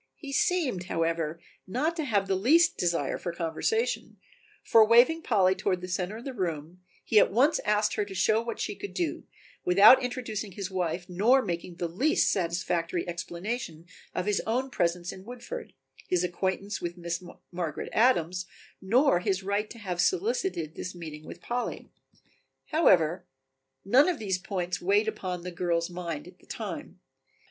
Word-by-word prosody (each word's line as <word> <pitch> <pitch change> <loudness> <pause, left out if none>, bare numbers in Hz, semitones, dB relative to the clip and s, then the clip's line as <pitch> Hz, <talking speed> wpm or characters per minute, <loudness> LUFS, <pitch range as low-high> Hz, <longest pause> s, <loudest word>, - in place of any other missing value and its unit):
He 285 -3 -9
seemed, 275 - +1
however, 165 -1 -1 0.3
not 290 - -1
to 315 - -1
have 205 -6 +1
the 195 - +1
least 310 - +4
desire 170 -6 -1
for 175 - -3
conversation, 170 - -1 0.5
for 225 - +6
waving 240 +9 +5
Polly 195 -9 +3
toward 190 -1 -1
the 180 - -6
center 185 +3 -3
of 235 - -11
the 270 - -4
room, 170 -4 -4 0.2
he 215 - +5
at - - +4
once 265 +9 +3
asked 210 0 +2
her 210 - -1
to 195 -1 -9
show 215 +4 +3
what 230 -1 -5
she - - -2
could 405 0 -8
do, 345 -3 -2 0.4
without 205 +8 +8
introducing 225 -5 -4
his 195 0 -5
wife 180 -1 -2
nor 225 +9 +3
making 175 -2 -4
the 170 0 -2
least 255 - +2
satisfactory 170 -1 -1
explanation 170 0 -5 0.3
of 180 - -1
his 210 -1 +1
own 255 +4 0
presence 175 -3 0
in 185 - -11
Woodford, 250 - -8 0.4
his 180 -1 +1
acquaintance 190 +3 -2
with 175 +1 -4
Miss 170 +1 -4 0.3
Margaret 170 -4 -4
Adams, 185 -6 +2 0.3
nor 230 +1 +3
his 190 +1 -1
right 200 +2 -1
to 235 - -10
have 185 -5 -2
solicited 375 - 0
this 185 +1 -6
meeting 155 -3 -8
with - - -10
Polly. 245 0 -4 0.8
However, 180 - +3 0.6
none 260 - +5
of 350 - -1
these 190 -5 -2
points 180 -2 -3
weighed 205 +4 +2
upon 185 -5 -4
the 180 - -5
girl's 170 0 -1
mind 170 -3 -5
at 180 +1 -15
the - - -23
time. - - -6
190 Hz, 165 wpm, -28 LUFS, 175-235 Hz, 0.8 s, without